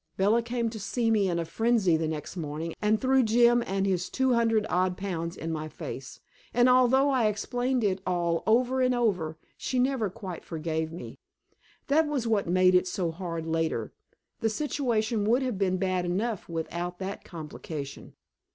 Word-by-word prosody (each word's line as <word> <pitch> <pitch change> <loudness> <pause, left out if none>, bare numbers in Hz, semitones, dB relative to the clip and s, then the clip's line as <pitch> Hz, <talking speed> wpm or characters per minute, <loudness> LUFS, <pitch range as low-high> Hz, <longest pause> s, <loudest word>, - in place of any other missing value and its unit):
Bella 210 +5 +3
came 235 -1 -2
to 220 - -7
see 225 +3 0
me 205 -3 +3
in 170 - 0
a 170 - -1
frenzy 220 -1 +2
the 160 0 0
next 155 +1 -5
morning 160 0 -4
and 215 +1 +2
threw 265 +2 +3
Jim 240 +1 +4
and 195 +1 0
his 185 -2 0
two 260 -1 +1
hundred 225 -2 +2
odd 180 0 +1
pounds 170 -3 -4
in 165 - -4
my 155 -1 -4
face, 130 -3 -8 0.3
and 245 +1 +5
although 255 +2 +5
I 250 -5 +3
explained 245 +4 -1
it 195 -2 +1
all 170 -2 0
over 250 +3 +3
and 255 0 +3
over, 180 -10 0 0.2
she 260 - -2
never 250 -4 +1
quite 190 -3 -7
forgave 160 -1 -3
me. 170 - -9 0.7
That 305 +3 +3
was 280 -5 -1
what 215 -5 +1
made 185 +1 +4
it 180 0 +4
so 180 -2 -1
hard 165 -1 -5
later 165 0 -1 0.5
the 225 - +1
situation 230 -4 0
would 240 +5 +3
have 245 -7 -2
been 185 -2 +1
bad 185 -1 0
enough 195 +4 -2
without 170 +2 -4
that 195 +1 -5
complication. 150 -3 -7
195 Hz, 180 wpm, -28 LUFS, 170-240 Hz, 0.7 s, and